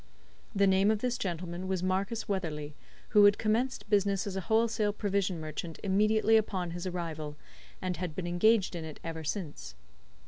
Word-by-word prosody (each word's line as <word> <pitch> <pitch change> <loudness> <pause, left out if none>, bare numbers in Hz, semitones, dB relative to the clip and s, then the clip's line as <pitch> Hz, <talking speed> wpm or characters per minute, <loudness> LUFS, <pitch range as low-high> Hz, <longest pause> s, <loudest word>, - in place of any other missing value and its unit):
The 200 0 +4
name 190 +1 +4
of 220 - +3
this 250 -1 0
gentleman 175 -2 -4
was 185 -1 -1
Marcus 195 +4 0
Weatherley, 155 -7 -3 0.4
who 210 -1 +7
had 205 0 +6
commenced 225 +3 0
business 200 -2 +2
as 200 -2 -4
a 190 - -1
wholesale 220 0 +2
provision 200 -4 -1
merchant 155 +1 -6
immediately 215 +3 +4
upon 185 -5 -1
his 175 +2 -4
arrival, 160 -4 -4 0.5
and 185 -1 -2
had 175 -4 -4
been 185 - -3
engaged 190 +3 +3
in 165 - -4
it 155 -1 -8
ever 165 -1 -5
since. 145 - -5
190 Hz, 170 wpm, -30 LUFS, 170-210 Hz, 0.5 s, who